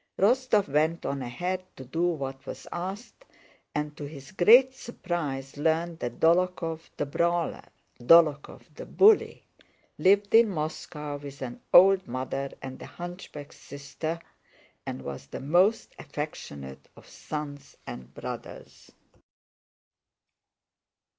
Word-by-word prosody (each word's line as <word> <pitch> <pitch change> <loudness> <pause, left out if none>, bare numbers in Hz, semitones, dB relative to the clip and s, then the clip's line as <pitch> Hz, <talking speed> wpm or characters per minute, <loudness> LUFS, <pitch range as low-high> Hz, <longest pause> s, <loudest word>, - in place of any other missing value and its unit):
Rostóv 220 -1 +3
went 155 +4 +1
on 140 -1 -2
ahead 180 +10 -3
to 130 - -10
do 160 +7 -3
what 135 -5 -4
was - - -7
asked, 195 - -6 0.5
and 150 0 -2
to 145 - -7
his 140 0 -11
great 235 +8 +6
surprise 150 - -5
learned 165 +2 0
that 120 -1 -5
Dólokhov 165 -1 +2 0.2
the 150 - -1
brawler, 170 +4 0 0.4
Dólokhov 150 +2 +4
the - - -9
bully, 425 +2 +4 0.6
lived 200 +2 +3
in 225 0 +7
Moscow 150 -3 -4
with 140 -1 -9
an 120 -2 -7
old 190 +1 +7
mother 130 +2 -3
and 130 -1 -7
a - - -8
hunchback 175 -4 -9
sister, 145 +4 -6 0.7
and 65 - -5
was 70 -1 -7
the - - -7
most 180 +10 +2
affectionate 75 - -7
of - - -16
sons 145 -2 -7
and 65 - -8
brothers. - - -8
155 Hz, 120 wpm, -27 LUFS, 140-180 Hz, 0.7 s, in